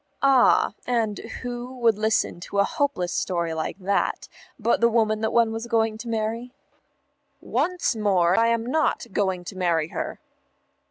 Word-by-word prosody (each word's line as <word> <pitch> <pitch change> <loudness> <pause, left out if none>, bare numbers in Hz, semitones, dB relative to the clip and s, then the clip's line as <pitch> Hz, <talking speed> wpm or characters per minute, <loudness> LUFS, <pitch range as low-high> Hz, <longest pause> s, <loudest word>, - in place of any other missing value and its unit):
"Ah, 270 -3 +4
and 225 -4 0 0.2
who 245 +1 -6
would 230 -3 +3
listen 215 -4 0
to 200 +3 -6
a 200 - +5
hopeless 275 - -1
story 170 -3 -1
like 160 +3 -3
that, 200 +1 -1 0.3
but 235 -1 +1
the 235 - +5
woman 220 -2 +1
one 230 0 +2
was 225 +1 -5
going 225 -2 +1
to 235 - -7
marry?" 230 +3 -3 0.8
"Once 360 -8 -1
more, 190 -5 +2
I 230 +2 +4
am 230 0 +1
not 310 +6 0
going 190 -3 0
to 190 - -8
marry 170 -4 0
her." - - -5
220 Hz, 155 wpm, -24 LUFS, 195-235 Hz, 0.8 s, a